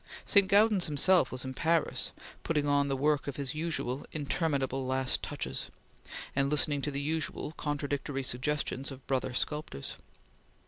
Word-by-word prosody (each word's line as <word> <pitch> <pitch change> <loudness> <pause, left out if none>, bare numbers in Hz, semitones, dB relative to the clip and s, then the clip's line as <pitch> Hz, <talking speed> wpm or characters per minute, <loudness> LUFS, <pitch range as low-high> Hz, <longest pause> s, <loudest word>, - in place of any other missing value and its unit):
St. 200 -2 +6
Gaudens 205 -2 +4
himself 150 +1 +3
was 130 +1 -3
in 130 - -4
Paris, 165 +3 +1 0.3
putting 150 -3 0
on 145 0 +3
the 135 -1 0
work 145 +1 +1
his 140 -2 -2
usual 155 -4 -2
interminable 140 -3 -1
last 130 0 +1
touches, - - -4 0.7
and 135 0 +2
listening 145 -1 +2
to 145 - -1
the 140 -1 -2
usual 155 +1 -2
contradictory 145 -2 -2
suggestions 135 +1 -1
of 135 -1 -10
brother 130 -2 -1
sculptors. 150 - -3
145 Hz, 140 wpm, -31 LUFS, 135-155 Hz, 0.7 s, St